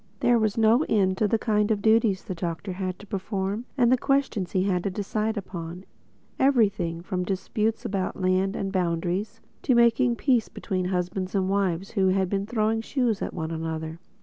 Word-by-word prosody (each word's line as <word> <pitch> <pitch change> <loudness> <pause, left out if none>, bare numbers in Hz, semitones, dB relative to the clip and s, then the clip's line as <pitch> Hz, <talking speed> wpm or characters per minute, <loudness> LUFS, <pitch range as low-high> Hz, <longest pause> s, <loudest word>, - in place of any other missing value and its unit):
There 240 -1 +4
was 215 -1 0
no 225 +5 +4
end 190 -3 +2
to 215 - +3
the 225 - +2
kinds 210 -1 +1
of 210 - +1
duties 220 -3 +3
the 200 - -5
Doctor 170 +1 -4
had 185 -1 -3
to 205 - -13
perform 195 +2 -3
and 240 -2 +4
the 255 - +4
questions 270 -10 0
he 185 - +2
had 180 -3 0
to - - 0
decide 210 +3 -2
upon—everything, 185 +2 -2
from 180 0 -3
settling 180 - -1
disputes 215 +5 -1
about 195 -4 -2
lands 185 +2 +1
and 195 -1 -2
boundaries, 180 +4 -1 0.2
to 255 - +2
making 235 +1 +4
peace 245 -3 +1
between 185 -1 -3
husband 185 +1 -2
and 190 -1 +1
wife 195 -2 0
who 195 -4 +2
had 190 0 +2
been 200 0 -1
throwing 225 -1 0
shoes 235 -3 0
at - - -2
one 160 -2 -4
another. 160 0 -4
195 Hz, 185 wpm, -26 LUFS, 185-225 Hz, 0.2 s, There